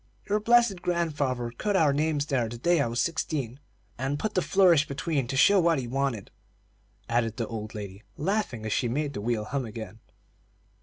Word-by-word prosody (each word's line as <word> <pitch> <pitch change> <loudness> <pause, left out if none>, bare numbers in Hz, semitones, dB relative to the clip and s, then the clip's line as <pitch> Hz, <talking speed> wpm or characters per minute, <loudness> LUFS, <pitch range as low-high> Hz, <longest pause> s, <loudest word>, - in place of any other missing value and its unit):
Your 210 +1 +1
blessed 230 -4 +3
grandfather 145 -9 -1
cut 205 - -1
our 155 -6 +4
names 150 0 0
there 130 -6 0
the 120 - -7
day 170 +5 +2
I 140 - +1
was 120 +1 -2
sixteen, 140 -5 -2 0.4
and 135 +2 -1
put 215 +6 -3
the 185 - +2
flourish 175 -6 +4
between 140 -2 -2
to 135 - -3
show 195 +8 +6
what 170 -2 +3
he 130 - -3
wanted," 130 -5 -2 0.8
added 115 -1 0
the 115 - -1
old 110 -1 -6
lady, 100 -1 -7 0.2
laughing 170 - -1
as 110 - -1
she 125 - +1
made 145 +4 -2
the 105 - -5
wheel 110 -1 -1
hum 135 +3 -2
again. 110 -2 -8
140 Hz, 190 wpm, -27 LUFS, 115-170 Hz, 0.8 s, show